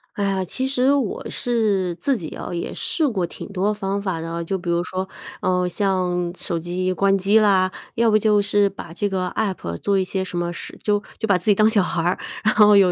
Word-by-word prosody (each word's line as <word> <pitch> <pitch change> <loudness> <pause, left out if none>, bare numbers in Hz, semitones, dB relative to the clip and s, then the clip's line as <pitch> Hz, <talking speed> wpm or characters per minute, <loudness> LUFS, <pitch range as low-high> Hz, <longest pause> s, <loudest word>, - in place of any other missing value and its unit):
哎 205 - -1
呀， 195 -1 0
其 260 +8 -2
实 265 0 +3
我 270 -8 -1
是 210 -7 0
自 275 - 0
己 165 -9 -5
哦， - - -6
也 170 - -3
试 320 - -1
过 195 -10 0
挺 - - -9
多 200 +2 0
方 200 -1 -2
法 185 -5 -2
的 165 - -5
啊。 170 0 -3
就 180 +3 -2
比 175 -1 -6
如 170 0 +2
说， 185 +1 -3 0.4
呃， 180 0 +1
像 180 -2 0
手 170 - -3
机 180 +2 -2
关 195 +1 +3
机 195 +3 +3
啦， 190 -3 +4 0.3
要 230 0 +3
不 215 - +5
就 210 -1 +3
是 200 0 +3
把 170 -4 -10
这 205 +4 -1
个 185 -1 -1
APP 190 - -2
做 195 - +1
一 190 - 0
些 190 +1 -2
什 180 -1 -5
么 175 0 -1
事 - - -7
就 205 -1 +1 0.2
就 220 - -1
把 200 -3 +4
自 180 - -7
己 - - +7
当 215 +2 +5
小 205 -3 +3
孩 170 -1 -1
儿， 175 +2 +1 0.3
然 215 - +3
后 210 -1 +7
有 190 -2 +5
195 Hz, 265 characters per minute, -22 LUFS, 180-210 Hz, 0.4 s, 己